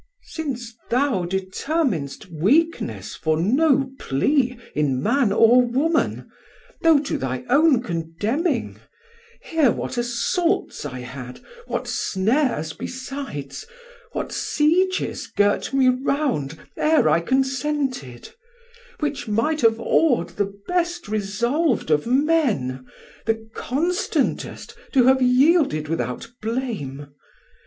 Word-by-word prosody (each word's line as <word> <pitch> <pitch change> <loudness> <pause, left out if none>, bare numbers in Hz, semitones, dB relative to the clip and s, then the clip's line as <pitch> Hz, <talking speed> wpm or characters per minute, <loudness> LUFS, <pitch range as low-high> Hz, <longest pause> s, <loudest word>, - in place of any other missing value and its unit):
Dal: - - -39 0.2
Since 250 -8 -5
thou 245 -7 +1
determinst 190 - -2
weakness 270 - +1
for 155 -1 0
no 270 - +2
plea 250 - +1 0.2
In 140 -4 0
man 235 - +2
or 230 +4 +6
woman, 275 +7 0 0.5
though 325 -2 +6
to 285 - -3
thy 130 -1 -3
own 280 -3 +4
condemning, 205 - -2 0.6
Hear 320 -6 +2
what 245 - -3
assaults 330 - -1
I 130 -2 -7
had, 125 0 -8 0.3
what - - -3
snares 205 - 0
besides, 255 - -6 0.5
What - - -3
sieges 365 +5 +1
girt 205 0 +1
me 270 -1 +3
round, 255 - -1 0.2
e're 310 - +3
I 155 +2 +4
consented; 265 - -1 0.7
Which 285 -4 -2
might 230 +9 0
have 225 -1 +4
aw'd 260 +2 +2
the 200 -1 -2 0.2
best 345 -1 -1
resolv'd 230 - 0
of 150 +6 +2
men, 245 - +1 0.4
The 225 0 -1
constantest 345 - -2 0.2
to 260 -3 +5
have 260 +1 +4
yielded 255 - +3
without 125 - -3
blame. 205 - -4
245 Hz, 105 wpm, -22 LUFS, -, 0.7 s, or